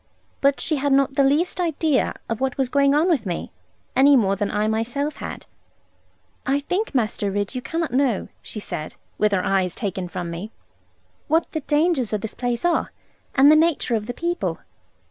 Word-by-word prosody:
But 280 0 +3
she 310 - -1
had 285 +1 0
not 275 0 +3
the 280 - +3
least 305 +7 +1
idea 320 -4 +1
of 230 +2 -3
what 265 -1 -1
was 265 -2 0
going 280 +1 +3
on 310 +4 +3
with 280 - +1
me, 175 - -4 0.4
any 280 +2 +6
more 200 -6 +3
than 205 0 -1
I 210 +1 0
myself 240 +7 -1
had. - - -7 1.0
'I 275 +1 +2
think, 365 +4 -2
Master 215 -4 0
Ridd, 205 +2 -2
you 255 - -3
cannot 325 -1 -3
know,' 255 -6 +1
she 215 - -7
said, 155 -6 -6 0.2
with 210 0 +3
her 185 -2 +1
eyes 190 -3 +1
taken 190 -3 -3
from 175 0 -5
me, 175 +6 -6 0.8
'what 325 +2 +1
the 315 - -2
dangers 295 -5 +1
of 210 - 0
this 220 - -5
place 245 +2 -2
are, 345 -1 +1 0.4
and 275 +2 +7
the - - +7
nature 315 -5 +2
of 215 -1 -1
the 245 - -3
people.' 345 +1 -2
265 Hz, 190 wpm, -23 LUFS, 210-295 Hz, 1.0 s, and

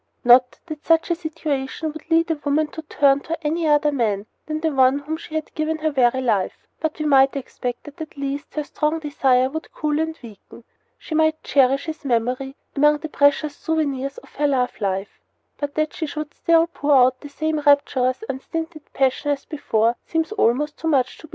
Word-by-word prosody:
Not 250 +1 +5
that 310 -3 -8
such 330 +1 +2
a - - +2
situation 315 -2 -3
would 315 +1 -11
lead 330 0 +3
a 305 -2 -3
woman 295 +2 +2
to 320 - -7
turn 285 -2 +3
to 330 +3 -4
any 320 +2 0
other 295 0 +3
man 215 -7 0 0.2
than 310 0 -2
the 320 0 0
one 265 0 +4
to 285 - -8
whom 310 +2 -3
she 315 -1 -9
had 315 - -3
given 315 0 -1
her 310 0 -1
very 260 -2 +2
life; 215 -7 -1
but 315 -1 -2
we 305 - -3
might 270 -2 +5
expect 250 -2 -5
that 295 +2 -11
at 310 -2 -8
least 280 +1 -4
her 300 - -1
strong 300 +2 -1
desire 270 -4 +2
would 315 +2 -6
cool 300 0 -1
and 320 0 -2
weaken. 230 +1 -13 0.3
She - - -8
might 315 0 +2
cherish 275 +1 +3
his 315 -1 -6
memory 255 +2 -1 0.2
among 295 +1 +4
the 315 +1 -7
precious 290 +1 +2
souvenirs 280 -4 -2
of - - -14
her 295 +1 +2
love 255 -3 +1
life; 195 0 -2 0.4
but 290 0 -4
that 310 0 0
she 315 - -3
should 300 0 -6
still 330 0 +3
pour 295 -4 +1
out 255 0 +4
the 290 - -9
same 310 +2 -2
rapturous, 285 - +2
unstinted 320 +3 -6
passion 270 +2 +1
as 285 -1 -1
before 235 -6 0
seems 325 +3 -1
almost 295 - +1
too 325 - -3
much 265 -5 +1
to 315 - -12
believe. - - -31
290 Hz, 205 wpm, -22 LUFS, 265-315 Hz, 0.4 s, Not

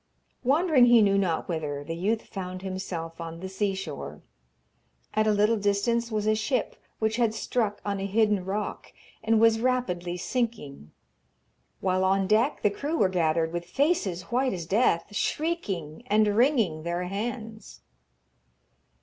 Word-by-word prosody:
Wandering 285 0 +4
he 235 -2 +7
knew 200 -1 +3
not 175 -5 -1
whither, 150 -4 -3
the 165 +3 -5
youth 210 +6 0
found 185 -2 -7
himself 170 -3 -5
on 165 0 -7
the 190 - -5
sea 195 +1 -1
shore. 140 - -7 0.9
At 215 0 +2
a - - +4
little 210 +2 +3
distance 220 +4 0
was 210 -1 -1
a 215 - +3
ship 220 +5 -1 0.2
which 220 +1 0
had 230 -3 +1
struck 220 -2 -1
on 200 -1 -1
a 195 - -2
hidden 210 -1 +2
rock, 200 +3 -4 0.3
and 220 0 +3
was 225 0 +5
rapidly 180 -9 -1
sinking, 195 - -3 0.9
while 185 0 +1
on 195 +1 +2
deck 220 +8 +2
the 210 - +4
crew 295 +10 -3
were 195 - +3
gathered, 165 -2 +1
with 175 0 -3
faces 190 - 0
white 255 +2 +1
as 175 -3 -5
death, 205 0 +1
shrieking 200 - -2
and 215 -1 +4
wringing 220 - +2
their 170 +2 -2
hands. 220 +3 -5
205 Hz, 150 wpm, -27 LUFS, 180-230 Hz, 0.9 s, he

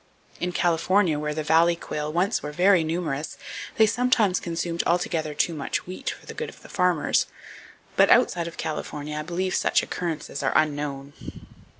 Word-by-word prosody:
In 180 - -1
California, 175 -1 +2
where 150 0 -2
the 155 - -2
valley 165 +2 +4
quail 150 -2 -4
once 180 +6 +1
were 150 - -5
very 180 +2 +4
numerous, 160 -3 -3 0.4
they 220 - +7
sometimes 225 -4 +2
consumed 170 0 -2
altogether 165 -3 0
too 170 - +1
much 145 -3 -3
wheat 185 +1 -5
for - - -8
the - - -8
good - - -4
of - - -15
the - - -13
farmers; 180 -4 +2 0.7
but - - +5
outside 170 -1 +4
of 170 - -9
California 150 -1 -4
I 150 - -2
believe 180 +4 -2
such - - +2
occurrences 165 -4 -4
are - - 0
unknown. 145 -2 -1
165 Hz, 170 wpm, -25 LUFS, 150-180 Hz, 0.7 s, they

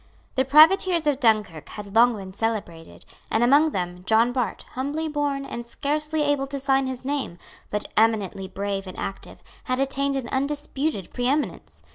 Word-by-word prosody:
The 260 - +1
privateers 325 +4 +5
of 290 -3 +1
Dunkirk 215 - +1
had 205 -2 -9
long 235 +1 +5
been 190 -2 -8
celebrated; 200 -7 -4 0.2
and 225 - +2
among 285 +6 +5
them, 180 - -4
John 225 +2 +4
Bart, 245 -6 -2
humbly 290 +5 -2
born, 290 -2 -2
and 235 - -6
scarcely 300 +5 -1
able 285 -2 +1
to 275 0 -4
sign 270 -1 +2
his 260 0 -5
name, 275 -11 -2 0.3
but 210 - -2
eminently 210 -4 +1
brave 195 0 -4
and 185 - -8
active, 195 - -7 0.2
had 255 0 -1
attained 275 +1 0
an 265 -3 -3
undisputed 280 - -2
preeminence. 265 +5 -2
260 Hz, 160 wpm, -24 LUFS, 210-285 Hz, 0.3 s, privateers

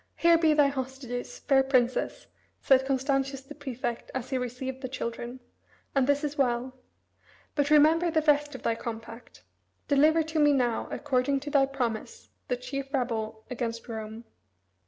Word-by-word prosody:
"Here 335 0 +5
be 315 -2 +4
thy 295 -1 +6
hostages, 260 -2 -5
fair 270 -2 +3
Princess," 255 -2 +1 0.3
said 265 0 +4
Constantius 270 0 0
the 270 +2 -11
prefect 255 -5 -5
as 260 0 -4
he 260 - +1
received 255 +2 -5
the 260 - -4
children; 240 0 -5 0.5
"and 270 -2 +2
this 285 +1 +2
is 295 -1 -3
well. 250 -1 +1 0.8
But 285 -1 +1
remember 315 +3 +5
the 315 -1 +1
rest 295 -1 +2
of - - -9
thy 230 - +2
compact. 230 +1 -8 0.4
Deliver 310 +3 +4
to 315 0 -2
me 295 -1 +5
now, 245 -4 +1
according 275 0 0
to 290 +1 -6
thy 275 -2 +4
promise, 270 - -4 0.2
the 250 - -1
chief 270 +2 -5
rebel 225 -5 -2
against 230 -2 -4
Rome." 220 0 -6
265 Hz, 155 wpm, -28 LUFS, 245-290 Hz, 0.8 s, thy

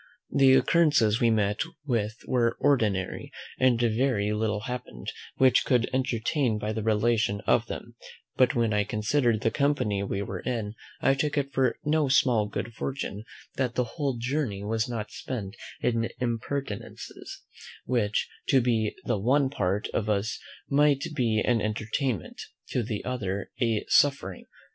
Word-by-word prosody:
The 135 -1 +6
occurrences 140 -9 +3
we 120 - +5
met 105 -2 +1 0.3
with 110 -5 0
were 115 -2 +1
ordinary, 110 -10 +1 0.3
and 130 -2 +4
very 115 -2 +1
little 105 -1 -1
happened 125 - -6 0.3
which 130 -1 +5
could 125 -2 +2
entertain 125 -1 0
by 105 +1 -3
the 110 - -2
relation 110 -1 +1
of - - +2
them: - - -7 0.4
but 130 -1 +3
when 115 -2 +2
I 105 0 +2
consider'd 110 +2 +1
the 115 - +1
company 140 -9 +1
we 100 0 -2
were 95 -2 -5
in, 110 -3 -3 0.3
I 135 - +4
took 145 +2 -1
it 140 -1 -1
for 130 -3 +2
no 150 -1 +2
small 125 -5 +3
good 115 +3 -5
fortune 110 -4 -4 0.3
that 125 -3 -1
the 125 - +2
whole 135 +1 -3
journey 120 -5 -2
was 110 +2 -1
not 105 -3 -4
spent 110 -6 -5 0.3
in 115 -1 +1
impertinences, 120 -1 -5 0.4
which 110 -4 0 0.2
to 135 - +5
the 115 -3 +1 0.2
one 135 +5 +2
part 100 -6 -1
of 110 - -2
us 105 +2 0 0.3
might 145 0 +3
be 115 -6 +1
an 120 -3 +2
entertainment, 110 - -2 0.3
to 125 - 0
the 110 -2 -4
other 100 -6 -3
a 115 -3 +1
suffering. 135 -11 +2
115 Hz, 150 wpm, -27 LUFS, 105-130 Hz, 0.4 s, The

